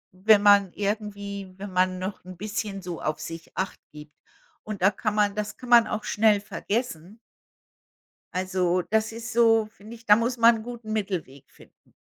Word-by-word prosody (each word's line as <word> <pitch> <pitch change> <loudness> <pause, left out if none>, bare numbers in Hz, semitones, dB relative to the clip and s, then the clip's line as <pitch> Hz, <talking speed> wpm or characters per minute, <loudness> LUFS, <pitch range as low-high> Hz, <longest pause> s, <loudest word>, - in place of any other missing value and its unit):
wenn 205 +2 +4
man 200 -2 +6
irgendwie 200 -2 -4
wenn 200 0 -7
man 185 0 +2
noch 185 +2 -5
'n 185 -1 -11
bisschen 205 -1 -4
so 175 -2 -6
auf 155 - -2
sich 165 0 -9
acht 190 0 -3
gibt. 150 0 -12 0.5
Und 210 -4 -6
da 195 - +6
kann 210 +2 -3
man 205 -1 +2
das 210 0 -4
kann 250 - -10
man 235 -1 +7
auch 215 - -3
schnell 210 -1 +3
vergessen. 205 -2 -4 1.2
Also, 185 -1 0
das 220 +1 +1
ist 230 +2 -7
so, 225 -2 +4
finde 215 +1 -14
ich, 230 0 -18
da 210 - +8
muss 235 +3 -1
man 230 0 +6
'n 220 - -7
guten 235 -2 -8
Mittelweg 180 -11 -4
finden. - - -22
205 Hz, 180 wpm, -25 LUFS, 185-220 Hz, 1.2 s, da